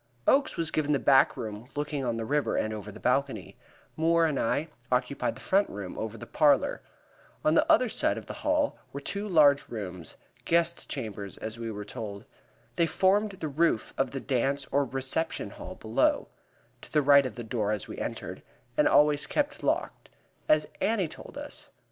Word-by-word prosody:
Oakes 275 +1 +3
was 165 -1 -1
given 150 -1 +1
the - - +3
back 135 -1 +4
room 110 0 -6
looking 145 -1 -2
on 120 -2 -1
the 115 - -3
river, 145 +4 0
and 110 - 0
over 105 -1 -6
the 110 - -12
balcony; 135 +2 0 0.4
Moore 165 +1 +3
and 150 -4 0
I 145 +7 0 0.2
occupied 125 +2 0
the - - -12
front 200 +2 +2
room, 100 -3 -6
over 110 0 -5
the - - -8
parlor. 145 -4 +3 0.6
On 155 - +4
the 325 - +4
other 285 -6 +5
side - - 0
of - - -7
the - - -6
hall 300 -1 +1
were 140 - -5
two 200 +8 -4
large 145 -5 +5
rooms 90 -7 -6 0.3
guest 170 0 +1
chambers, 105 -7 -5 0.2
we 115 -1 -4
were 105 -1 -6
told. 105 -1 -6 0.5
They 170 - +3
formed 200 +4 +2
the 170 -4 -5
roof 150 -5 +1
of 135 -1 0
the 135 - -4
dance 135 +1 0
or 140 0 +2
reception 135 +5 -1
hall - - -9
below - - +1 0.5
to - - -13
the 150 -1 +3
right 140 -1 +6
of 115 - -9
the 120 - -6
door 110 -2 -1
as 105 -3 -3
we - - -7
entered - - -5 0.3
and 150 - +4
always 150 0 +4
kept 295 0 -1
locked, - - -1 0.4
as 155 0 +5 0.2
Annie 205 -5 +1
told - - -11
us. - - -9
140 Hz, 185 wpm, -28 LUFS, 115-165 Hz, 0.6 s, right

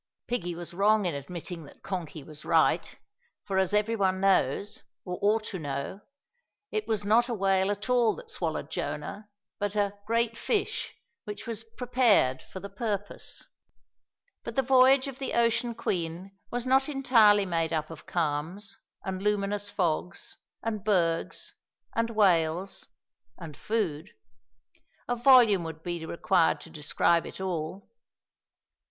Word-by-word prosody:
Piggie 175 -8 -2
was 175 0 -7
wrong 205 +2 +3
in 175 - 0
admitting 165 +3 -6
that. - - -17
Konky 170 -5 -5
was 155 -1 -11
right, - - +2 0.5
for, 195 -2 0
as 190 0 +1
every 210 +2 +2
one 190 -3 +1
knows, 195 +1 +1 0.2
or 180 -1 -4
ought 215 +2 +3
to 190 - -5
know, 145 +6 -4 0.7
it 430 -1 -2
was 210 -2 -1
not 235 +4 +4
a 235 - -1
whale 195 -1 +2
at 205 +2 -3
all 245 -2 +3
that 475 -2 -11
swallowed - - -3
Jonah, 210 +1 -4 0.3
but 205 0 -2
a 200 -1 +1
"great 230 0 +1
fish" 415 - -1 0.3
which 210 -2 -6
was 225 -2 -4
"prepared" 225 - +2
for 190 - -9
the 200 - -7
purpose. 205 -1 -4 1.0
But - - -6
the 270 - +3
voyage 260 +1 +5
of 270 -1 -7
the 270 - -3
Ocean 235 0 +2
Queen 180 -2 -3
was 245 0 -3
not 265 +2 +3
entirely 225 -8 +5
made 165 -3 0
up 155 -1 -2
of 160 - -11
calms, 170 +5 -2 0.3
and 190 -1 -3
luminous 205 0 0
fogs, 180 -1 -2 0.3
and 215 -3 -3
bergs, 170 -6 0 0.4
and 230 0 +1
whales, 185 -4 +2 0.5
and 160 -3 -9
food. 185 -9 -2 1.0
A 245 - 0
volume 240 -6 +6
would 160 -1 -7
be 175 -2 -3
required 180 -1 +2
to 165 - -11
describe 165 +2 +1
it - - -9
all. 185 0 -4
200 Hz, 145 wpm, -28 LUFS, 170-225 Hz, 1.0 s, volume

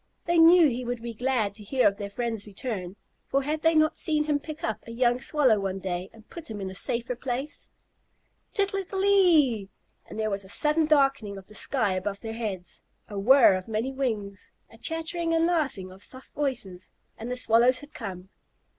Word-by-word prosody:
They 345 0 +2
knew 335 0 +8
he 250 -1 -2
would 245 -1 -4
be 235 -1 -5
glad 235 -3 0
to 210 +1 -10
hear 255 +5 +2
of 200 - 0
their 200 -1 -5
friends' 225 -1 -3
return, 200 -3 -5 0.3
for 275 0 +1
had 305 +2 -2
they 325 0 +3
not 310 0 +3
seen 305 -2 +2
him 295 -1 0
pick 310 +1 -9
up 220 - -2
a - - -7
young 245 +1 +1
Swallow 265 -9 +3
one 195 -1 -2
day 185 0 -4
and 225 0 -18
put 335 -6 -10
him 215 -2 -6
in 190 -1 -4
a - - -8
safer 235 +5 -2
place? 260 +4 -5 0.8
"Tittle 395 -1 0
ittle 385 0 -3
ittle - - +2
ee!" 310 - +4 0.4
and - - -9
there 215 -1 -1
was 200 0 -1
a 190 - -13
sudden 300 +7 +2
darkening 275 -9 +2
of 195 - -11
the 210 - -16
sky 225 -3 0
above 195 +2 -3
their 225 -1 -5
heads, 205 -6 -4 0.3
a 205 -2 -4
whirr 245 0 +6
of 185 0 -5
many 225 +4 -2
wings, 215 -7 -3 0.2
a - - -15
chattering 330 +1 -1
and 330 0 +3
laughing 280 - -1
of 190 +2 -13
soft 260 0 -6
voices, 225 -11 -3 0.2
and 225 +2 -7
the 250 - -3
Swallows 245 +1 +4
had 290 +3 -11
come. 190 -4 -7
240 Hz, 210 wpm, -27 LUFS, 200-300 Hz, 0.8 s, knew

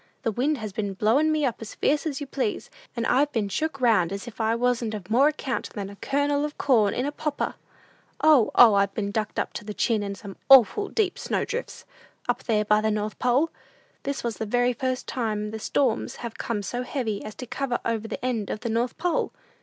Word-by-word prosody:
The 230 - +1
wind 275 +7 0
has 215 -4 -6
been 200 -2 -3
blowin' 255 +11 +3
me 305 -2 +1
up 245 - -1
as 220 - -8
fierce 295 +2 +1
as 285 -3 -3
you 290 - -4
please, 400 - -3 0.3
and 230 - 0
I've 285 +5 +3
been 215 -6 -1
shook 290 +8 -2
round 220 -9 +3
as 200 +2 -5
if 235 -1 -6
I 220 +1 +2
wasn't 235 -2 0
of 200 -1 -8
more 265 +5 +5
account 270 -6 -2
than 200 -1 -5
a - - -11
kernel 285 +3 0
of 300 0 -4
corn 220 -7 +3
in 255 - -1
a 290 - -1
popper! 295 0 -2 0.7
"O, 300 -7 +5
O, 235 -3 +8
I've 200 0 +2
been 200 -2 -2
ducked 215 0 -2
up - - -1
to - - -6
the 210 0 -7
chin 225 -4 +1
in 200 -1 -4
some 195 0 -10
awful 270 - +7
deep 415 -5 0
snow - - -1
drifts, 475 +2 -5 0.4
up - - -1
there 210 -2 +1
by 210 0 +4
the 220 - +1
North 210 0 -2
Pole! 260 +6 +2 0.5
This 280 -3 -3
is 230 -2 -2
the 220 - -3
very 245 +3 +2
first 255 +1 -2
time 210 -4 -2
the 220 - -5
storms 245 +1 0
have 235 -2 -7
come 210 -3 -2
so 245 +6 -3
heavy 245 -6 -3
as 215 - -8
to 250 - -7
cover 250 0 -2
over 225 -1 -1
the 235 - -5
end 230 -5 -1
of 215 - -4
the 235 - -3
North 230 +2 -1
Pole! 350 -1 0
235 Hz, 230 wpm, -25 LUFS, 215-275 Hz, 0.7 s, O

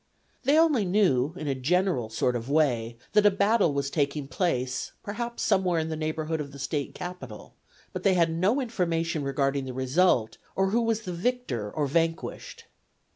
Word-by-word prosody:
They 285 +3 +4
only 310 -9 +4
knew 175 -7 +2
in 155 - -5
a 140 - +1
general 145 - 0
sort 120 +3 0
of 120 +2 -4
way 120 -7 +1 0.2
that 210 0 +5
a - - +8
battle 200 -2 +2
was 140 0 -2
taking 140 -1 -1
place 130 -7 -1
perhaps 235 +3 -4
somewhere 185 -3 +2
in 160 0 -2
the 160 - -2
neighborhood 155 0 -2
of 140 -1 -7
the 140 - -11
State 140 +1 -3
Capital, 180 0 -8 0.4
but - - -4
they 195 -2 +3
had 170 -2 +3
no 185 +11 +1
information 170 - -1
regarding 140 0 0
the 130 - -5
result, 130 -3 +2 0.2
or 190 0 +1
who 235 +3 +2
was 225 -1 0
the 180 -5 -5
victor 180 - -2
or 150 - -1
vanquished. 165 +3 -2
165 Hz, 180 wpm, -27 LUFS, 140-195 Hz, 0.4 s, a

